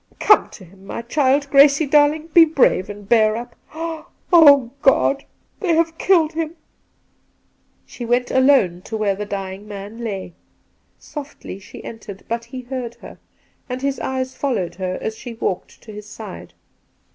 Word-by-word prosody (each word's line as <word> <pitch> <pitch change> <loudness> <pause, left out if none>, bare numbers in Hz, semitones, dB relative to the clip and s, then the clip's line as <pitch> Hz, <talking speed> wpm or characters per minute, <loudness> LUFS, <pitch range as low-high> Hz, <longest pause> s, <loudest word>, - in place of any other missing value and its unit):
Come 420 - +4
to 190 - -13
him, 190 +2 -19
my 230 - -5
child. 280 +3 +1
Gracie 280 +2 +6
darling, 300 +3 +3
be 340 - +9
brave 275 - +2
and 205 -1 -9
bear 220 -1 +3
up. 235 0 -8 0.8
Oh, 285 -7 +7
God! 275 0 +3 0.3
they 350 -6 +1
have 325 0 +1
killed 335 -4 +3
him 325 0 -3 0.7
!' - - -43
She 245 - -9
went 245 +1 0
alone 260 -10 +3
to 220 - -4
where 210 -2 +1
the 205 +1 -6
dying 195 0 -6
man 205 +2 -8
lay. 195 -6 -5 0.6
Softly 285 - -9
she 195 - -12
entered, 210 -4 -9
but 230 0 -3
he 255 +2 -8
heard 245 -2 -6
her, - - -13 0.5
and 255 +1 -5
his 275 -1 -1
eyes 260 0 -3
followed 205 -11 -2
her 185 0 -4
as 220 - -4
she 235 +1 -9
walked 190 -4 -4
to 220 - -11
his 210 0 -10
side. - - -10
240 Hz, 160 wpm, -20 LUFS, 205-280 Hz, 0.8 s, be